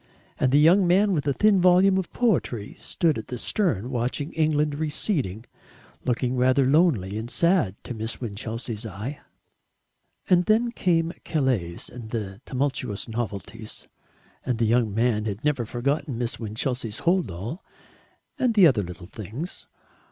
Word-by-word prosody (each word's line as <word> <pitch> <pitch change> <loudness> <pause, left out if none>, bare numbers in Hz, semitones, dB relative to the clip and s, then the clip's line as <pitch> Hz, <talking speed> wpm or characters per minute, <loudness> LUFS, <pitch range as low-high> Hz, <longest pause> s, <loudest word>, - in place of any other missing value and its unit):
And 130 - +2
the 140 - +5
young 175 +5 +6
man 195 +3 +4
with 150 -5 -1
the 140 - +2
thin 205 +3 +4
volume 185 +2 +5
of 185 - -5
poetry 160 - 0
stood 160 -8 0
at 110 - -9
the 125 -1 -5
stern 130 - 0
watching 125 +4 -2
England 155 -2 +1
receding, 145 - -1 0.6
looking 125 +1 0
rather 130 +2 +3
lonely 130 - +2
and 115 +2 -6
sad 170 - +2
to - - -5
Miss 110 0 -4
Winchelsea's 115 0 -5
eye. 110 +7 -6 1.1
And 180 -1 +4
then 230 +4 +3
came 170 -6 +1
Calais 125 - 0 0.2
and 110 -5 -5
tumultuous 130 -5 -2
novelties, 110 -1 -5 0.6
and 125 -3 -1
the 115 - +1
young 115 -1 +2
man 110 0 +1
had 105 +4 -4
not 150 -1 +2
forgotten 135 +2 -1
Miss 120 -1 -3
Winchelsea's 115 0 -3
hold 180 - +2
all 105 - -6 0.8
and 245 -3 +2
the 200 -4 +7
other 130 -10 +4
little 90 -2 -8
things. 110 - -7
125 Hz, 145 wpm, -25 LUFS, 110-165 Hz, 1.1 s, the